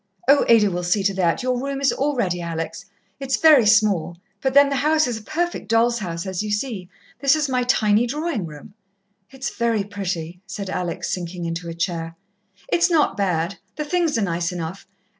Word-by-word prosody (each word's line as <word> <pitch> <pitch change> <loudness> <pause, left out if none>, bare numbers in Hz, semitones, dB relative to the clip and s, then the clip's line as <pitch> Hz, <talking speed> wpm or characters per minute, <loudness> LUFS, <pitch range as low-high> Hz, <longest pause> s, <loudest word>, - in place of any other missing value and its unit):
"Oh, 280 +1 +6
Ada 215 -4 +5
will 175 0 -2
see 180 +3 +1
to 195 0 +2
that. 185 +5 0
Your 250 -1 0
room 275 0 -3
is 275 0 +3
all 290 +1 -1
ready, 180 -7 -1
Alex. 165 +1 -5 0.3
It's 270 -2 -1
very 300 -8 +6
small, 205 -6 +3 0.2
but 265 0 -1
then 280 0 +7
the 275 - -1
house 310 +3 +3
is 235 -3 -3
a - - -14
perfect 345 +10 -3
doll's 235 +1 +2
house, 170 -3 -4
as 190 -1 -3
you 210 - -4
see. 210 -4 -3 0.3
This 275 +1 +4
is 305 -1 0
my 255 -1 0
tiny 225 -2 +2
drawing 290 - -2
room." 150 +6 -12 0.6
"It's 265 0 -6
very 230 -3 +1
pretty," 180 -4 -5
said 195 -1 -5
Alex, 175 -2 -3
sinking 175 -1 -5
into 170 +1 -4
a 165 - -6
chair. 165 -1 -3 0.5
"It's 345 - +2
not 325 -4 +2
bad 185 -2 -1 0.2
the 300 - -3
things 335 -3 +1
are 220 - +1
nice 170 -1 -1
enough. 175 +2 -6
210 Hz, 195 wpm, -22 LUFS, 175-265 Hz, 0.6 s, then